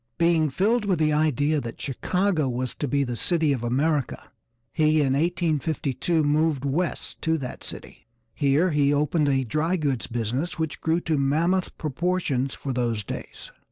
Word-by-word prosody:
Being 165 Hz, -2 st, +3 dB
filled 210 Hz, -, +1 dB
with 190 Hz, -3 st, +1 dB
the 155 Hz, -1 st, +2 dB
idea 150 Hz, 0 st, +1 dB
that 115 Hz, -2 st, -7 dB
Chicago 165 Hz, +2 st, 0 dB
was 125 Hz, 0 st, -2 dB
to 145 Hz, -, -3 dB
be 140 Hz, +1 st, +1 dB
the 125 Hz, -2 st, -3 dB
city 160 Hz, +2 st, +2 dB
of 125 Hz, -3 st, -4 dB
America, 140 Hz, +4 st, -1 dB, 0.4 s
he 155 Hz, 0 st, +3 dB
in 135 Hz, -3 st, +2 dB
1852 160 Hz, -1 st, 0 dB
moved 150 Hz, -1 st, +1 dB
'West' 155 Hz, +5 st, -2 dB
to 160 Hz, 0 st, +1 dB
that 130 Hz, -4 st, -7 dB
city. -, -, -7 dB, 0.3 s
Here 145 Hz, +6 st, +2 dB
he 145 Hz, -2 st, +3 dB
opened 150 Hz, +1 st, +1 dB
a 135 Hz, -1 st, +2 dB
dry 155 Hz, +9 st, 0 dB
goods 140 Hz, -8 st, -1 dB
business 120 Hz, +9 st, -2 dB
which 160 Hz, -2 st, -3 dB
grew 165 Hz, +2 st, +1 dB
to 160 Hz, -4 st, 0 dB
mammoth 165 Hz, +7 st, +1 dB
proportions 150 Hz, -3 st, -1 dB
for 135 Hz, -, -4 dB
those 120 Hz, -4 st, -1 dB
days. -, -, -7 dB
150 Hz, 160 wpm, -25 LUFS, 135-165 Hz, 0.4 s, Being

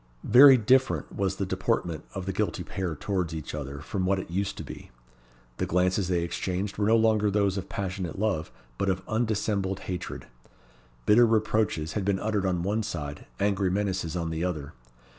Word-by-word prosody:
Very 130 Hz, +3 st, +9 dB
different 130 Hz, +4 st, +2 dB
was 95 Hz, -1 st, 0 dB
the 100 Hz, -, -2 dB
deportment 85 Hz, -3 st, -1 dB
of 95 Hz, -2 st, -4 dB
the 95 Hz, -, -2 dB
guilty 105 Hz, +2 st, -1 dB
pair 95 Hz, -5 st, -3 dB
towards 90 Hz, 0 st, -2 dB
each 80 Hz, -1 st, -6 dB
other 70 Hz, -1 st, -5 dB
from 95 Hz, +6 st, -3 dB
what 95 Hz, +1 st, +2 dB
it 95 Hz, -, -6 dB
used 95 Hz, +2 st, -2 dB
to -, -, -5 dB
be. -, -, -10 dB, 0.7 s
The -, -, -1 dB
glances 90 Hz, +2 st, +1 dB
they 90 Hz, -2 st, +1 dB
exchanged 95 Hz, +4 st, -3 dB
were 105 Hz, -, +2 dB
no 110 Hz, -, +5 dB
longer 110 Hz, -2 st, +3 dB
those 100 Hz, -1 st, +1 dB
of 95 Hz, -1 st, -5 dB
passionate 95 Hz, -4 st, -4 dB
love, 95 Hz, -6 st, -1 dB, 0.3 s
but 100 Hz, -, +1 dB
of 95 Hz, -1 st, -2 dB
undissembled 105 Hz, -4 st, -1 dB
hatred. 90 Hz, -1 st, -5 dB, 0.8 s
Bitter 120 Hz, +3 st, +6 dB
reproaches 105 Hz, -8 st, +1 dB
had 105 Hz, -, -1 dB
been 100 Hz, 0 st, +1 dB
uttered 105 Hz, -2 st, 0 dB
on 90 Hz, -2 st, 0 dB
one 105 Hz, +4 st, 0 dB
side, 75 Hz, -7 st, -5 dB
angry 100 Hz, -1 st, +1 dB
menaces 95 Hz, -4 st, -1 dB
on 85 Hz, -2 st, -2 dB
the 80 Hz, +1 st, -2 dB
other. 75 Hz, -5 st, -3 dB
95 Hz, 180 wpm, -27 LUFS, 90-105 Hz, 0.8 s, Very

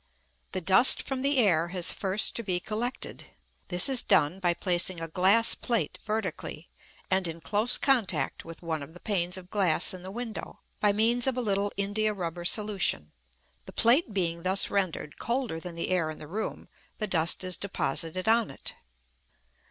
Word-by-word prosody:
The 185 Hz, -, -2 dB
dust 190 Hz, +8 st, +6 dB
from 265 Hz, -1 st, -4 dB
the 280 Hz, +1 st, +1 dB
air 175 Hz, -9 st, +3 dB
has 180 Hz, 0 st, +1 dB
first 195 Hz, +2 st, +2 dB
to -, -, -2 dB
be 185 Hz, -5 st, -1 dB
collected. 225 Hz, +6 st, -5 dB, 0.4 s
This 180 Hz, 0 st, +7 dB
is 265 Hz, -3 st, +5 dB
done 150 Hz, +6 st, +2 dB
by 175 Hz, -2 st, 0 dB
placing 175 Hz, 0 st, +1 dB
a 165 Hz, -, -4 dB
glass 195 Hz, +7 st, +4 dB
plate 235 Hz, -2 st, -2 dB
vertically, 210 Hz, -6 st, -4 dB, 0.4 s
and 190 Hz, -1 st, +1 dB
in 165 Hz, 0 st, -6 dB
close 205 Hz, +10 st, +1 dB
contact 250 Hz, -9 st, 0 dB
with 165 Hz, +1 st, -11 dB
one 160 Hz, -2 st, -3 dB
of 160 Hz, +4 st, -11 dB
the -, -, -11 dB
panes 180 Hz, -3 st, -1 dB
of 185 Hz, -1 st, -12 dB
glass 190 Hz, -7 st, +2 dB
in 185 Hz, -, -8 dB
the 185 Hz, -, -8 dB
window, 225 Hz, +2 st, -7 dB, 0.2 s
by 210 Hz, -, +3 dB
means 230 Hz, +4 st, +1 dB
of 260 Hz, -1 st, 0 dB
a -, -, 0 dB
little 200 Hz, -3 st, -1 dB
india 210 Hz, +2 st, -1 dB
rubber 175 Hz, -2 st, -5 dB
solution. 200 Hz, -, 0 dB, 0.6 s
The -, -, -11 dB
plate 245 Hz, +3 st, +3 dB
being 170 Hz, -4 st, -1 dB
thus 190 Hz, +2 st, +1 dB
rendered 185 Hz, -6 st, -3 dB
colder 235 Hz, -8 st, -2 dB
than 175 Hz, 0 st, -8 dB
the 170 Hz, -, -3 dB
air 175 Hz, -4 st, 0 dB
in 155 Hz, -, -7 dB
the -, -, -10 dB
room, 210 Hz, +7 st, -5 dB, 0.3 s
the 215 Hz, -, -2 dB
dust 170 Hz, -3 st, +2 dB
is 185 Hz, -1 st, 0 dB
deposited 180 Hz, 0 st, -3 dB
on 230 Hz, 0 st, +3 dB
it. 135 Hz, -, -8 dB
190 Hz, 180 wpm, -27 LUFS, 170-220 Hz, 0.6 s, This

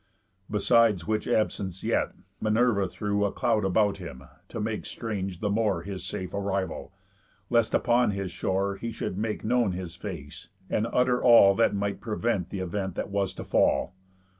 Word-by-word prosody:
Besides 105 Hz, -3 st, +3 dB
which 110 Hz, 0 st, -1 dB
absence 95 Hz, -4 st, -1 dB
yet, -, -, 0 dB, 0.3 s
Minerva 110 Hz, -2 st, +2 dB
threw 100 Hz, +2 st, -1 dB
A 100 Hz, -, +1 dB
cloud 105 Hz, -, +1 dB
about 100 Hz, +2 st, +2 dB
him, 85 Hz, -9 st, -9 dB, 0.2 s
to -, -, -6 dB
make 110 Hz, 0 st, -3 dB
strange 95 Hz, -5 st, -4 dB
the 105 Hz, -, 0 dB
more 100 Hz, -5 st, +1 dB
His 95 Hz, -1 st, -6 dB
safe 90 Hz, -1 st, -5 dB
arrival, 100 Hz, -1 st, -2 dB, 0.6 s
lest 115 Hz, -2 st, +3 dB
upon 120 Hz, -1 st, +3 dB
his 100 Hz, -3 st, -3 dB
shore 95 Hz, +2 st, -1 dB
He 115 Hz, +3 st, -4 dB
should 110 Hz, -, -4 dB
make 105 Hz, +2 st, -3 dB
known 120 Hz, -3 st, +2 dB
his 90 Hz, -2 st, -5 dB
face, 85 Hz, -6 st, -8 dB, 0.2 s
and 110 Hz, -, +1 dB
utter 125 Hz, 0 st, +2 dB
all 115 Hz, -5 st, +8 dB
That 115 Hz, 0 st, +2 dB
might 100 Hz, 0 st, -2 dB
prevent 105 Hz, -4 st, -1 dB
th' -, -, -7 dB
event 95 Hz, 0 st, -3 dB
that -, -, -4 dB
was 100 Hz, -1 st, 0 dB
to -, -, -6 dB
fall. 90 Hz, -, +2 dB
100 Hz, 165 wpm, -27 LUFS, 95-110 Hz, 0.6 s, all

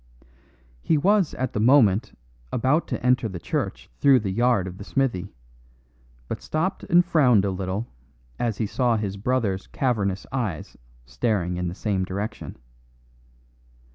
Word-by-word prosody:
He 155 Hz, -, +2 dB
was 195 Hz, +3 st, +2 dB
at 130 Hz, -, -3 dB
the -, -, -1 dB
moment 115 Hz, -2 st, +4 dB, 0.3 s
about 130 Hz, +7 st, +1 dB
to -, -, -4 dB
enter 125 Hz, -2 st, +3 dB
the 95 Hz, -, -6 dB
church 85 Hz, -, -3 dB
through 135 Hz, -4 st, +5 dB
the 100 Hz, -3 st, -2 dB
yard 120 Hz, -2 st, +2 dB
of 95 Hz, 0 st, -8 dB
the -, -, -6 dB
smithy, 105 Hz, -6 st, -1 dB, 1.0 s
but -, -, -5 dB
stopped 160 Hz, +5 st, -2 dB
and 175 Hz, -1 st, +4 dB
frowned 125 Hz, -, +4 dB
a 100 Hz, -, 0 dB
little 95 Hz, +3 st, -3 dB, 0.5 s
as 115 Hz, -4 st, -1 dB
he 110 Hz, -, 0 dB
saw 120 Hz, +2 st, +1 dB
his 100 Hz, -2 st, -3 dB
brother's 100 Hz, -3 st, -1 dB
cavernous 100 Hz, -8 st, -1 dB
eyes 110 Hz, -, -3 dB, 0.3 s
staring 90 Hz, -, -1 dB
in 90 Hz, 0 st, -2 dB
the 85 Hz, -, -5 dB
same 100 Hz, -3 st, -1 dB
direction. 100 Hz, +4 st, -5 dB
110 Hz, 145 wpm, -24 LUFS, 95-130 Hz, 1.0 s, through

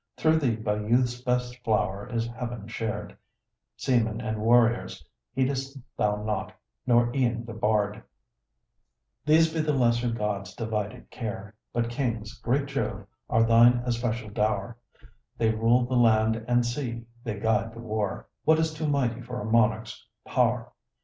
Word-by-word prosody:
Through 160 Hz, 0 st, +3 dB
thee 125 Hz, -7 st, +1 dB
by 105 Hz, -1 st, -1 dB
youth's 120 Hz, +3 st, +1 dB
best 125 Hz, 0 st, -1 dB
flower 100 Hz, -1 st, 0 dB
is 115 Hz, -1 st, 0 dB
heaven 120 Hz, -2 st, -6 dB
shared 110 Hz, -2 st, -4 dB, 0.6 s
Seamen 115 Hz, -4 st, +1 dB
and 110 Hz, -2 st, -3 dB
warriors 120 Hz, +1 st, +3 dB, 0.3 s
heed'st 135 Hz, +1 st, -1 dB, 0.2 s
thou 105 Hz, 0 st, 0 dB
not, 105 Hz, 0 st, -2 dB, 0.3 s
nor 120 Hz, -1 st, +4 dB
e'en 120 Hz, -3 st, +1 dB
the 115 Hz, -, -7 dB
bard: 105 Hz, -1 st, 0 dB, 1.3 s
These 160 Hz, +1 st, +5 dB
be 165 Hz, -, -1 dB
the 155 Hz, -1 st, +1 dB
lesser 120 Hz, -1 st, +2 dB
gods' 105 Hz, -4 st, -3 dB
divided 110 Hz, +1 st, -4 dB
care 105 Hz, -3 st, -6 dB, 0.2 s
But 115 Hz, 0 st, -1 dB
kings, 115 Hz, -4 st, -2 dB
great 135 Hz, +4 st, +1 dB
Jove, 110 Hz, -7 st, -3 dB, 0.2 s
are 115 Hz, -, +4 dB
thine 120 Hz, +1 st, +5 dB
especial 115 Hz, -3 st, -2 dB
dow'r; 105 Hz, +1 st, -1 dB, 0.6 s
They 110 Hz, -1 st, +2 dB
rule 115 Hz, +3 st, +3 dB
the 130 Hz, -, -4 dB
land 110 Hz, -2 st, +3 dB
and 120 Hz, 0 st, +3 dB
sea; 120 Hz, -2 st, -3 dB, 0.2 s
they 110 Hz, -5 st, -4 dB
guide 110 Hz, +1 st, 0 dB
the -, -, -9 dB
war 110 Hz, -3 st, -3 dB, 0.2 s
What 160 Hz, +1 st, +5 dB
is 160 Hz, 0 st, 0 dB
too 155 Hz, 0 st, -3 dB
mighty 125 Hz, -5 st, 0 dB
for 125 Hz, +1 st, -6 dB
a 105 Hz, -, -5 dB
monarch's 110 Hz, 0 st, +1 dB, 0.2 s
pow'r? -, -, +1 dB
115 Hz, 150 wpm, -27 LUFS, 110-125 Hz, 1.3 s, These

